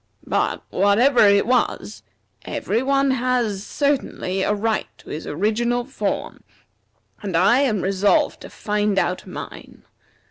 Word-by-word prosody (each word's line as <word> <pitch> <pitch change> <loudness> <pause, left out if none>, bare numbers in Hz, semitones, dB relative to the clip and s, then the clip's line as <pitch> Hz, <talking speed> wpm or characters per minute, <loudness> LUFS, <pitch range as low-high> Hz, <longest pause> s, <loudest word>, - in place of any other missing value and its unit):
But, - - -1
whatever 215 +5 +4
it 200 0 +4
was, 250 +2 -1 0.4
every 225 +3 -2
one 275 0 +2
has 245 -6 0
certainly 265 -9 -1
a 190 - +1
right 215 +1 -1
to - - -13
his 155 - -6
original 235 +8 0
form, 270 - -4 0.8
and 195 -5 -2
I 240 +8 +4
am 230 -9 +1
resolved 195 +1 +1
to - - -10
find 210 -1 -1
out 180 -1 -1
mine. - - -9
215 Hz, 130 wpm, -22 LUFS, 200-250 Hz, 0.8 s, whatever